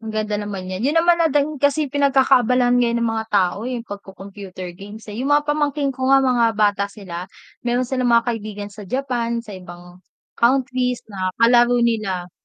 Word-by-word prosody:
Maganda 215 -1 -3
naman 200 -3 -6
'yan, 185 +3 -4
'yun 295 - +1
naman 340 +1 +4
natin 300 -2 +1
kasi 285 +1 +1
pinagkakaabalahan 255 -3 +3
ngayon 235 -1 +1
ng 230 - +1
mga 220 0 -3
tao, 200 +3 +1
yung 250 -2 -4
pagko 200 -3 -10
computer 190 -2 -9
games, 205 +5 -11
eh. 210 - -7
Yung 275 +3 +2
mga 295 - +3
pamangkin 295 -1 0
ko 260 0 -3
nga 270 0 +5
mga 240 -3 +2
bata 205 -1 +1
sila, 185 -4 -8 0.4
meron 245 +1 +1
silang 255 0 -1
mga 235 +1 +3
kaibigan 210 -2 -6
sa 205 0 -11
Japan, 235 -1 -2
sa 210 -4 -9
ibang 175 0 -13 0.4
countries 250 0 +1
na 185 -2 -3
kalaro 240 +1 +4
nila. 200 -6 -1
235 Hz, 180 wpm, -20 LUFS, 200-260 Hz, 0.4 s, nga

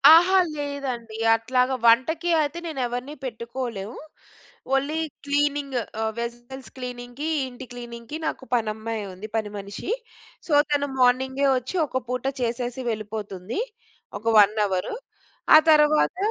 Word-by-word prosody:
ఆహా! 370 +3 +6 0.2
లేదండి. 265 -6 -4 0.2
అట్లాగా 250 +3 +1
వంటకి 320 +9 +4
అయితే 300 +3 -2
నేనెవరిని 260 -2 -3
పెట్టుకోలేం. 235 -3 -5 0.8
ఓల్లీ 285 +4 0 0.3
క్లీనింగ్. 285 -1 0 0.2
ఆహ్, 220 0 0
వెస్సెల్స్ 240 +3 -6
క్లీనింగ్‌కి, 250 +4 -5 0.2
ఇంటి 255 +1 -9
క్లీనింగ్‌కి 240 +3 -7
నాకు 265 - -4
పనమ్మాయుంది, 215 -3 -3
పని 210 -2 -2
మనిషి. 200 - -5 0.6
సో, - - -5 0.2
తను 285 0 +2
మార్నింగే 260 +2 +3
ఒచ్చి, 255 +9 -4
ఒక 260 -1 -2
పూట 250 +1 -2 0.2
చేసేసి 245 +1 -2
వెళ్ళిపోతుంది. 210 - -4 0.6
ఒక 220 - -22
1 205 +1 +6
అవరు. 185 - -2 0.6
ఆ - - +12
తరవాత 305 +3 +4
250 Hz, 115 wpm, -25 LUFS, 225-285 Hz, 0.8 s, ఆ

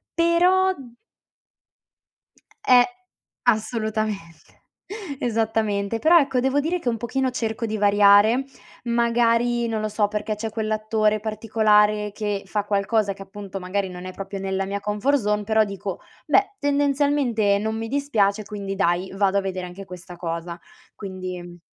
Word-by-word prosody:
però 360 +3 +3 1.9
Eh 245 -1 +7 0.6
assolutamente 215 -6 -2 0.6
esattamente, 220 -2 0
però 340 +2 +6
ecco 270 -4 +1
devo 265 +3 +1
dire 350 +4 -1
che 255 - -8
un 235 - 0
pochino 260 +3 -1
cerco 230 -1 -3
di 220 -1 -3
variare, 205 +4 +5 0.4
magari 235 0 +2
non 220 -1 -2
lo 215 - -2
so 210 0 +1
perché 210 +1 -3
c'è 220 +1 -4
quell'attore 215 0 0
particolare, 210 -1 +2
che 205 -2 -3
fa 210 -1 -2
qualcosa, 205 0 +1
che 195 - -14
appunto 195 -1 -8
magari 190 +1 -2
non 180 0 -8
è 185 - -7
proprio 195 +1 -6
nella 195 0 -2
mia 200 +1 -3
comfort 210 +8 +1
zone, 210 -2 0
però 220 +1 +3
dico: 195 -2 -5 0.3
"Beh, 405 0 +2
tendenzialmente 280 -7 +2
non 220 +1 -2
mi 225 0 -4
dispiace, 220 -7 +1
quindi 200 -1 -5
dai, 185 -1 0
vado 195 0 +1
a - - -2
vedere 185 -1 -4
anche 180 +3 -9
questa 180 -1 -10
cosa". 170 0 -5 0.4
Quindi 185 -3 -7
215 Hz, 140 wpm, -23 LUFS, 200-235 Hz, 1.9 s, Eh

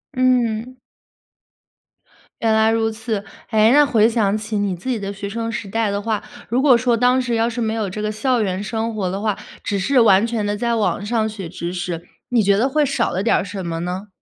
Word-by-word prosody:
嗯。 250 -1 +1 1.7
原 225 -1 +2
来 220 0 +4
如 225 0 +1
此。 220 -2 -4 0.3
诶， 220 +1 +5
那 295 +1 +6
回 225 -4 +4
想 215 -3 +1
起 215 0 -4
你 200 -2 0
自 185 +10 -7
己 240 - 0
的 200 0 -4
学 200 0 -6
生 230 +1 -3
时 215 -3 -5
代 220 +1 0
的 200 0 -2
话， 220 -1 -2 0.3
如 245 +4 +1
果 265 -4 +6
说 235 0 +1
当 250 +2 +3
时 240 -2 -1
要 225 +1 +1
是 240 0 -4
没 220 -1 0
有 215 -3 -2
这 210 +3 -5
个 215 - -1
校 245 +2 0
园 190 -2 -1
生 225 +2 -2
活 190 -4 -1
的 195 +2 -4
话， 210 -2 0 0.3
只 200 -1 -1
是 255 +7 +2
完 200 -1 +5
全 225 -3 -2
地 205 - -1
在 235 +1 0
网 210 -2 0
上 220 0 0
学 200 -5 -7
知 170 +1 -5
识， 175 -2 -4 0.3
你 240 -3 +3
觉 200 0 +3
得 250 +5 +2
会 295 +2 +2
少 275 - 0
了 190 +3 -2
点 230 - +3
儿 - - -1
什 190 -1 -6
么 165 -1 -3
呢？ 180 +4 -4
220 Hz, 250 characters per minute, -20 LUFS, 200-235 Hz, 1.7 s, 那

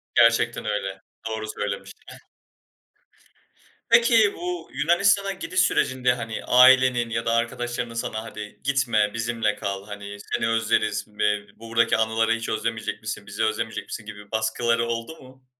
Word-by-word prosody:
Gerçekten 115 -1 +3
öyle, 95 -2 -3 0.3
doğru 110 0 -4
söylemiştir. 105 -1 -5
Heh. - - -11 1.7
Peki 230 -3 +5
bu 175 -1 -5
Yunanistan'a 195 +4 +3
gidiş 185 0 -3
sürecinde, 130 -8 +2
hani 115 -2 -5
,ailenin 125 -2 +6
ya 115 0 -2
da 115 - +1
arkadaşlarının 120 0 -2
sana 110 -1 -3
"Hadi 105 -1 -9
gitme, 120 -7 +1
bizimle 115 -2 -1
kal, 100 0 -4
hani, 100 0 -8
seni 115 - -2
özleriz, 110 -2 +1
be 105 0 +3 0.2
buradaki 115 0 +1
anıları 110 0 +1
hiç 115 0 -4
özlemeyecek 110 0 -3
misin, - - -6
bizi - - -3
özlemeyecek - - -2
misin" - - -7
gibi 105 +1 -11
baskıları 115 +1 +1
oldu 115 +7 -4
mu? 130 0 -17
115 Hz, 140 wpm, -24 LUFS, 110-130 Hz, 1.7 s, ailenin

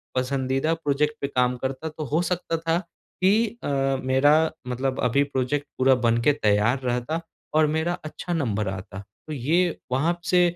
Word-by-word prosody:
पसंदीदा 130 +3 0
प्रोज़ेक्ट 150 -2 0
पे 140 - 0
काम 125 -2 +1
करता 130 +5 -4
तो 155 0 -6
हो 160 - +3
सकता 175 -1 -1
था 165 +1 0 0.5
कि 210 +5 +5 0.2
अ, - - -3 0.4
मेरा 145 +5 +4 0.2
मतलब 130 +1 -2
अभी 125 +3 +3
प्रोज़ेक्ट 140 +1 -2
पूरा 130 0 +5
बन 115 0 +4
के 145 +5 +4
तैयार 110 -1 +2
रहता 125 +6 -1 0.3
और 155 -1 +5
मेरा 160 +3 0
अच्छा 175 +3 -5
नंबर 110 - -1
आता। 95 +1 -6 0.3
तो 155 - -4
ये 165 +6 +1
वहाँ 155 +7 +1
से 180 0 +4
140 Hz, 165 wpm, -25 LUFS, 125-160 Hz, 0.5 s, कि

